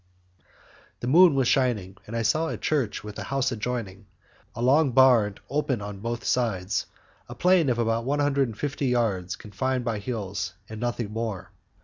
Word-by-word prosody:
The - - -3
moon 165 +3 +6
was 135 -3 +2
shining, 110 -9 +1
and 115 - -6
I 115 - 0
saw 155 +9 +2
a - - -3
church 135 -9 -1
with 105 -1 -8
a - - -5
house 135 -1 0
adjoining, 105 -4 -4 0.5
a - - -5
long 135 +1 +4
barn 120 -6 +5
opened 140 -6 -1
on 100 -1 -7
both 115 +3 -4
sides, 105 -7 0 0.4
a 120 - -7
plain 175 0 +3
of 120 - +1
about 115 0 0
one 140 +4 0
hundred 140 -6 +1 0.2
yards 115 -9 0
confined 125 +4 -3
by 115 -3 -1
hills, 100 -4 -4
and 110 0 -8
nothing 120 -3 -2
more. 110 -4 -4
120 Hz, 165 wpm, -26 LUFS, 105-130 Hz, 0.5 s, moon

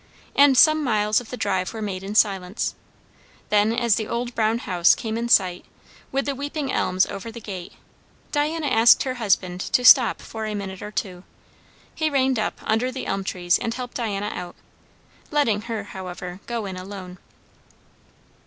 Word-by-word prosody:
And 280 -2 +6
some 310 +1 +6
miles 215 -3 +2
of 235 - -14
the 250 - -6
drive 185 -3 -1
were - - -5
made 190 -3 -4
in 200 +2 -6
silence. 195 -2 +1 0.8
Then 210 +1 +3
as 235 -2 +2
the 220 - -3
old 240 +1 -3
brown 225 0 +1
house 180 -6 +3
came 220 -2 -4
in 235 +1 -2
sight, 180 -5 +3 0.5
with 275 +1 -1
the 280 - -1
weeping 285 +1 -4
elms 185 +1 +1
over 200 +3 -7
the 235 - -9
gate, 190 -5 -8 0.6
Diana 305 +2 -1
asked 230 -4 +5
her 260 - -2
husband 185 -3 0
to 250 - 0
stop 250 -3 +7
for 220 -1 -6
a 210 - -3
minute 190 -2 -6
or 210 - -6
two. 185 -4 -5 0.7
He 315 -1 0
reined 265 -4 +1
up - - -2
under 225 +4 0
the 260 0 -6
elm 195 - -2
trees 175 -2 0
and 230 0 -3
helped 250 -1 -6
Diana 210 -3 -2
out, 175 -1 -7 0.7
letting 235 -9 +1
her, 220 -3 -3
however, 180 -2 -8
go 235 -3 -3
in 190 -2 -6
alone. 185 -1 -9
215 Hz, 175 wpm, -23 LUFS, 190-245 Hz, 0.8 s, stop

